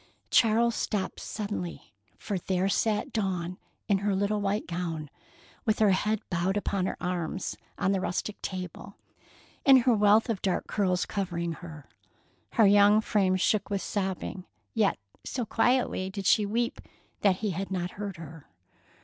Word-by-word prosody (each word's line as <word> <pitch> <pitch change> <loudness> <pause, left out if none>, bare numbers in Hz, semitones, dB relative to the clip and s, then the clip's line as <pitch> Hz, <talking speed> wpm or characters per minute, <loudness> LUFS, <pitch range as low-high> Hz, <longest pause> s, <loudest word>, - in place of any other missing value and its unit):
Charles 230 +1 +4
stopped 200 -4 -2
suddenly, 200 - -5 0.2
for 200 -3 -3
there 185 +1 0
sat 210 +1 0
Dawn 185 -4 -2 0.3
in 200 -1 +3
her 200 0 0
little 205 +2 0
white 205 +2 0
gown, 165 -4 -4 0.5
with 215 -1 +1
her 215 -2 +4
head 210 +3 +1
bowed 180 +3 +1
upon 195 -2 0
her - - -3
arms, 180 0 -3 0.2
on 190 - +1
the 195 -1 +1
rustic 190 +3 -3
table, 185 +1 -6 0.7
and 270 -3 +7
her 245 0 +4
wealth 210 +1 +4
of 225 -5 -2
dark 190 -2 0
curls 185 -3 0
covering 175 -4 -2
her. 160 -3 -9 0.7
Her 225 - +5
young 205 +1 +6
frame 195 -3 +2
shook 200 +2 +1
with 200 -2 -1
sobbing, 190 -2 -3 0.3
yet 215 -3 +2 0.3
so 245 -3 -3
quietly 230 -4 +1
did 195 0 -6
she 210 +2 +4
weep 235 +3 -1 0.4
that 195 -3 +4
he 205 - +1
had 190 +3 -4
not 180 -2 -2
heard 200 -2 -6
her. 160 -2 -10
195 Hz, 155 wpm, -28 LUFS, 180-210 Hz, 0.7 s, and